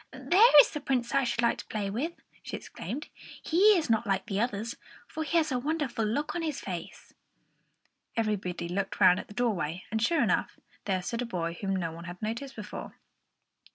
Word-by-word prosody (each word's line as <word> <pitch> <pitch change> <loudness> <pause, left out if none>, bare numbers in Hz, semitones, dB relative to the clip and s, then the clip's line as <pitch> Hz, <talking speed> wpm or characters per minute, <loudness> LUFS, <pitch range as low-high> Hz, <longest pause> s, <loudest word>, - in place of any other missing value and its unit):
"There 375 -3 +6
is - - -1
the 300 - -5
Prince 250 -3 -1
I 275 0 +3
should 235 -1 0
like 235 - +2
to - - -8
play 205 -2 -3
with," 285 +11 -2 0.3
she - - -5
exclaimed. 240 - -6 0.3
"He 390 +5 +5
is 320 - -1
not 225 -1 +1
like 195 -1 0
the 195 -1 -2
others, 230 0 -1 0.3
for 315 - -4
he 335 +2 +1
has 310 -3 +2
a 250 - +1
wonderful 290 -4 -1
look 235 +8 -1
on 345 - -2
his 310 -4 -2
face." 180 -4 -7 1.0
Everybody 200 -6 -1
looked 190 +2 -3
round 180 0 +6
at - - -8
the 205 - -13
doorway; 185 -8 -1
and, 220 0 0
sure 305 +4 +3
enough, 205 -6 0 0.3
there 185 -2 0
stood 230 +5 -3
a - - -1
boy 170 -5 -3
whom 195 -1 0
no 170 -3 -2
one 170 +2 -9
had 175 0 -8
noticed 235 +6 -4
before. 210 -1 -7
230 Hz, 200 wpm, -29 LUFS, 195-280 Hz, 1.0 s, There